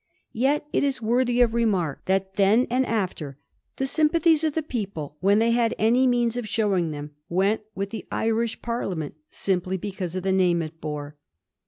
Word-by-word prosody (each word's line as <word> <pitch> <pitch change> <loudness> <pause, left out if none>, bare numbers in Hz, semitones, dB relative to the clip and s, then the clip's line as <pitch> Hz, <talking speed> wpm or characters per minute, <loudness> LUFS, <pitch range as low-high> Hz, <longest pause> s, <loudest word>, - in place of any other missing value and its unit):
Yet 275 +6 +1
it - - +2
is 275 -2 0
worthy 245 +2 +2
of 235 -2 +4
remark, 195 -11 0
that 190 0 0
then 205 +5 +4
and 255 +1 +2
after, 175 - -2 0.4
the 270 - -1
sympathies 315 +2 +3
of 310 -2 0
the 320 - 0
people, 200 - -5
when 200 +3 +3
they 230 +1 +3
had 230 -1 +2
any 245 +4 +3
means 240 -1 +1
of 230 -4 -4
showing 195 -6 +1
them, 150 -1 -6 0.2
went 195 +5 +1
with 195 +1 -3
the 225 - -7
Irish 225 0 -1
Parliament 190 -10 -3 0.2
simply 185 -1 -1
because 185 -2 -5
of 185 - -3
the 190 - +1
name 180 -3 +3
it 160 +1 -9
bore. 150 -1 -5
210 Hz, 180 wpm, -25 LUFS, 180-240 Hz, 0.4 s, of